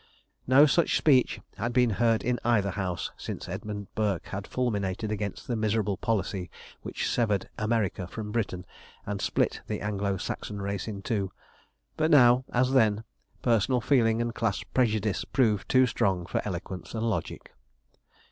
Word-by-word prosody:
No 135 Hz, +4 st, +7 dB
such 165 Hz, +3 st, +3 dB
speech 135 Hz, -5 st, +3 dB, 0.2 s
had 120 Hz, -, -2 dB
been 125 Hz, -2 st, +4 dB
heard 115 Hz, +1 st, +2 dB
in 125 Hz, 0 st, 0 dB
either 105 Hz, -5 st, +2 dB
House 90 Hz, -4 st, -3 dB
since -, -, -6 dB
Edmund 105 Hz, -1 st, -5 dB
Burke 100 Hz, -5 st, -1 dB
had 100 Hz, +1 st, -5 dB
fulminated 105 Hz, -4 st, -1 dB
against 105 Hz, -2 st, -4 dB
the 120 Hz, -, -1 dB
miserable 110 Hz, -2 st, 0 dB
policy 95 Hz, -2 st, -2 dB, 0.3 s
which -, -, -3 dB
severed 105 Hz, -5 st, 0 dB
America 110 Hz, -5 st, 0 dB
from 105 Hz, +3 st, -6 dB
Britain, 100 Hz, -6 st, -2 dB, 0.4 s
and 100 Hz, -1 st, -3 dB
split -, -, 0 dB
the -, -, -3 dB
Anglo 100 Hz, -1 st, -1 dB
Saxon 100 Hz, +2 st, -5 dB
race 100 Hz, 0 st, -3 dB
in 100 Hz, -3 st, -6 dB
two; 100 Hz, -5 st, -1 dB, 0.7 s
but 155 Hz, 0 st, +2 dB
now, 125 Hz, -4 st, +6 dB
as 125 Hz, +1 st, +2 dB
then, 110 Hz, -5 st, +3 dB, 0.4 s
personal 120 Hz, +2 st, +3 dB
feeling 115 Hz, -2 st, +2 dB
and 120 Hz, 0 st, -3 dB
class 115 Hz, -5 st, -1 dB
prejudice 110 Hz, -5 st, 0 dB
proved 110 Hz, -6 st, +1 dB
too 130 Hz, 0 st, +5 dB
strong 95 Hz, -6 st, 0 dB
for -, -, -1 dB
eloquence 95 Hz, +1 st, -5 dB
and 115 Hz, +1 st, -1 dB
logic. 110 Hz, -, -4 dB
110 Hz, 155 wpm, -28 LUFS, 100-120 Hz, 0.7 s, No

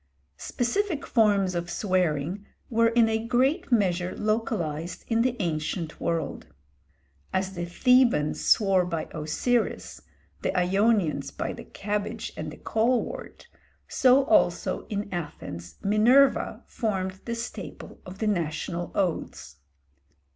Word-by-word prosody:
Specific 315 Hz, +6 st, -1 dB
forms 205 Hz, -5 st, +3 dB
of 175 Hz, 0 st, -3 dB
swearing 180 Hz, -1 st, -1 dB, 0.2 s
were 230 Hz, 0 st, +4 dB
in 230 Hz, 0 st, +4 dB
a 220 Hz, 0 st, 0 dB
great 255 Hz, +5 st, +1 dB
measure 185 Hz, -5 st, +1 dB
localised 175 Hz, -7 st, -2 dB
in 230 Hz, -1 st, +2 dB
the 250 Hz, 0 st, +1 dB
ancient 160 Hz, -1 st, -2 dB
world. 165 Hz, -4 st, -2 dB, 0.8 s
As 190 Hz, 0 st, -1 dB
the 175 Hz, -2 st, -3 dB
Thebans 240 Hz, -, +3 dB
swore 195 Hz, -3 st, +4 dB
by 170 Hz, -2 st, -3 dB
Osiris, 220 Hz, +10 st, -1 dB, 0.4 s
the -, -, -1 dB
Ionians 195 Hz, -1 st, +2 dB
by -, -, -4 dB
the -, -, -10 dB
cabbage 205 Hz, 0 st, -4 dB
and -, -, -5 dB
the -, -, -10 dB
colewort, 235 Hz, +2 st, -1 dB, 0.4 s
so 265 Hz, +1 st, +4 dB
also -, -, +2 dB
in 205 Hz, -1 st, -3 dB
Athens 85 Hz, -, -6 dB
Minerva 240 Hz, +7 st, +4 dB
formed 190 Hz, -4 st, -3 dB
the 235 Hz, -, -2 dB
staple 225 Hz, -7 st, -7 dB
of 185 Hz, +1 st, -10 dB
the 220 Hz, -, -2 dB
national 170 Hz, -2 st, -2 dB
oaths. 170 Hz, -, -2 dB
200 Hz, 120 wpm, -26 LUFS, 175-230 Hz, 0.8 s, were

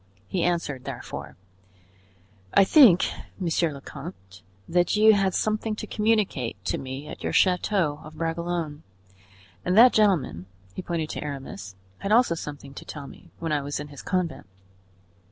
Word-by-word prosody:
He 180 Hz, -, -1 dB
answered 165 Hz, -7 st, -1 dB
therefore: -, -, -7 dB, 1.2 s
"I -, -, +8 dB
think, 195 Hz, -, +7 dB, 0.3 s
monsieur 170 Hz, -2 st, +1 dB
le 140 Hz, -1 st, -9 dB
comte, 95 Hz, -, -10 dB, 0.3 s
that 175 Hz, +1 st, +2 dB
you 215 Hz, +1 st, +7 dB
had 195 Hz, -3 st, +1 dB
something 215 Hz, 0 st, 0 dB
to -, -, -6 dB
communicate 210 Hz, -, 0 dB
to -, -, -1 dB
me 135 Hz, +2 st, -6 dB
at -, -, -9 dB
your -, -, -2 dB
chateau 180 Hz, -4 st, +2 dB
of 155 Hz, 0 st, -11 dB
Bragelonne, 165 Hz, -1 st, -3 dB, 0.8 s
and 180 Hz, +3 st, +1 dB
that 245 Hz, +2 st, +9 dB
gentleman"—he 95 Hz, -, 0 dB
pointed 165 Hz, -3 st, -3 dB
to -, -, -5 dB
Aramis—"had 100 Hz, -, -7 dB
also 235 Hz, -5 st, +5 dB
something 145 Hz, -4 st, -7 dB
to -, -, -9 dB
tell 145 Hz, -2 st, -8 dB
me 135 Hz, -, -14 dB
when 165 Hz, -1 st, -3 dB
I 150 Hz, -1 st, +1 dB
was 145 Hz, +1 st, -4 dB
in 150 Hz, 0 st, -7 dB
his 145 Hz, -, -10 dB
convent. 180 Hz, -, -2 dB
165 Hz, 150 wpm, -26 LUFS, 140-190 Hz, 1.2 s, that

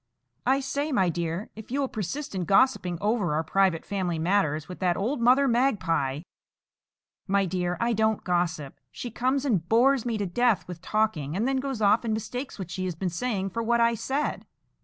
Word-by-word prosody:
"I 270 Hz, +2 st, +3 dB
say, 285 Hz, +3 st, -2 dB
my 190 Hz, -9 st, +2 dB
dear, 170 Hz, +3 st, -3 dB
if 220 Hz, 0 st, -10 dB
you 270 Hz, +4 st, -1 dB
will 275 Hz, -, +1 dB
persist 255 Hz, -, -4 dB
in 185 Hz, -2 st, -2 dB
gossiping 195 Hz, -3 st, +3 dB
over 205 Hz, -6 st, 0 dB
our 160 Hz, -, 0 dB
private 185 Hz, 0 st, +1 dB
family 185 Hz, -4 st, -2 dB
matters 160 Hz, -3 st, +1 dB
with 180 Hz, -, -9 dB
that 180 Hz, -2 st, +1 dB
old 235 Hz, +6 st, -1 dB
Mother 255 Hz, +4 st, +5 dB
Magpie—" 165 Hz, -, +1 dB, 1.1 s
"My 200 Hz, 0 st, +2 dB
dear, 180 Hz, -1 st, -2 dB
I 235 Hz, 0 st, +1 dB
don't 220 Hz, 0 st, +1 dB
gossip. 175 Hz, -5 st, -1 dB
She 245 Hz, -, -6 dB
comes 260 Hz, +4 st, 0 dB
and 190 Hz, -, 0 dB
bores 250 Hz, +2 st, +4 dB
me 235 Hz, -2 st, -1 dB
to 205 Hz, -, -1 dB
death 235 Hz, +4 st, +1 dB
with 175 Hz, -2 st, -8 dB
talking, 185 Hz, -8 st, -1 dB
and 220 Hz, +6 st, 0 dB
then 270 Hz, 0 st, +1 dB
goes 260 Hz, -4 st, -2 dB
off 205 Hz, +3 st, +4 dB
and 220 Hz, -2 st, 0 dB
mistakes 245 Hz, +5 st, -5 dB
what 185 Hz, -4 st, -7 dB
she 185 Hz, -, -3 dB
has 180 Hz, -3 st, -3 dB
been 180 Hz, +2 st, -2 dB
saying 195 Hz, 0 st, -2 dB
for 230 Hz, -, -2 dB
what 235 Hz, +1 st, +1 dB
I 235 Hz, 0 st, +4 dB
said." 270 Hz, +6 st, -2 dB
205 Hz, 200 wpm, -27 LUFS, 180-245 Hz, 1.1 s, Mother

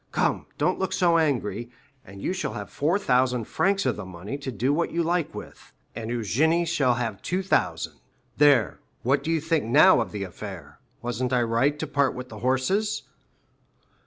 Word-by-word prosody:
Come, -, -, 0 dB
don't -, -, +1 dB
look 190 Hz, -, -1 dB
so 170 Hz, -2 st, +3 dB
angry, 120 Hz, -7 st, -1 dB, 0.3 s
and 100 Hz, -3 st, -12 dB
you -, -, 0 dB
shall 190 Hz, -11 st, -3 dB
have 105 Hz, -3 st, -7 dB
4,000 130 Hz, -, +1 dB
francs 195 Hz, -, +1 dB
of 125 Hz, -4 st, 0 dB
the 105 Hz, -, -5 dB
money 95 Hz, +5 st, -7 dB
to 140 Hz, -2 st, -5 dB
do 125 Hz, +5 st, 0 dB
what 170 Hz, +3 st, 0 dB
you 170 Hz, 0 st, 0 dB
like 170 Hz, -1 st, -1 dB
with, -, -, -10 dB, 0.2 s
and 115 Hz, -1 st, -5 dB
Eugénie 150 Hz, -, +1 dB
shall 135 Hz, -7 st, +2 dB
have 115 Hz, -5 st, -3 dB
2,000. 185 Hz, +2 st, 0 dB, 0.4 s
There, 140 Hz, -7 st, +4 dB, 0.2 s
what 135 Hz, +4 st, +2 dB
do -, -, -3 dB
you 165 Hz, -1 st, +2 dB
think 160 Hz, -3 st, 0 dB
now 150 Hz, +11 st, +6 dB
of -, -, -4 dB
the 105 Hz, -2 st, -4 dB
affair? 90 Hz, -5 st, -9 dB, 0.2 s
Wasn't 120 Hz, +1 st, -2 dB
I 125 Hz, -1 st, +3 dB
right 120 Hz, +6 st, +1 dB
to 160 Hz, -, -3 dB
part 140 Hz, -2 st, +1 dB
with 125 Hz, 0 st, -7 dB
the -, -, -9 dB
horses?" 130 Hz, -, 0 dB
130 Hz, 180 wpm, -25 LUFS, 115-165 Hz, 0.4 s, now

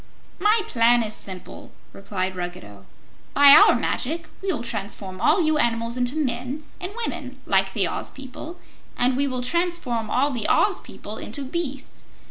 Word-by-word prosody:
"My 425 Hz, +3 st, +4 dB
plan 235 Hz, -, +4 dB
is 215 Hz, -1 st, -2 dB
simple," 185 Hz, -3 st, -7 dB, 0.2 s
replied 190 Hz, -1 st, -3 dB
Ruggedo. 140 Hz, -, -7 dB, 0.5 s
"By 285 Hz, 0 st, +9 dB
our -, -, +8 dB
magic 320 Hz, +5 st, -2 dB
we 390 Hz, -1 st, -1 dB
will 265 Hz, -9 st, -3 dB
transform 200 Hz, -4 st, -4 dB
all 375 Hz, -, +4 dB
you 310 Hz, -1 st, +2 dB
animals 230 Hz, -1 st, +1 dB
into 250 Hz, +2 st, 0 dB
men 260 Hz, 0 st, -2 dB, 0.2 s
and 365 Hz, +2 st, -5 dB
women 270 Hz, -6 st, -6 dB
like 195 Hz, 0 st, +2 dB
the 195 Hz, -5 st, +1 dB
Oz -, -, -3 dB
people 275 Hz, +6 st, -9 dB, 0.4 s
and 250 Hz, +1 st, +2 dB
we 280 Hz, +2 st, +1 dB
will 255 Hz, -2 st, -3 dB
transform 290 Hz, -8 st, -1 dB
all 280 Hz, +6 st, +2 dB
the 240 Hz, -4 st, -2 dB
Oz -, -, +3 dB
people -, -, -9 dB
into 285 Hz, -, -5 dB
beasts. 275 Hz, -2 st, -5 dB
250 Hz, 160 wpm, -23 LUFS, 215-300 Hz, 0.5 s, By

